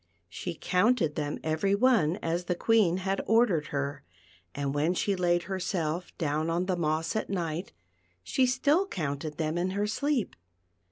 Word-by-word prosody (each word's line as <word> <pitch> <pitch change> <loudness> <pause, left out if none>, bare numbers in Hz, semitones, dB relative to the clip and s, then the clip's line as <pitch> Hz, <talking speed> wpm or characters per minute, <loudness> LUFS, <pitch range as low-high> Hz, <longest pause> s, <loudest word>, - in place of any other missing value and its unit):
She 170 - -5
counted 180 -2 +2
them 150 -1 -3
every 160 +6 +1
one 200 -9 +3
as 170 +2 -1
the 180 - 0
Queen 205 -3 +3
had 195 +1 -1
ordered 220 -9 +3
her, 140 0 -3 0.5
and 140 0 -2
when 155 +5 +1
she 200 +2 +1
laid 175 -1 +1
herself 180 -2 -2
down 155 0 -1
on 170 +2 0
the 185 -1 0
moss 160 +2 -1
at 220 - -2
night 175 -2 -3 0.5
she 255 - +2
still 290 +9 +2
counted 150 - -4
them 160 +1 -1
in 180 +2 0
her 205 - +1
sleep. 260 +3 -1
175 Hz, 160 wpm, -29 LUFS, 155-200 Hz, 0.5 s, one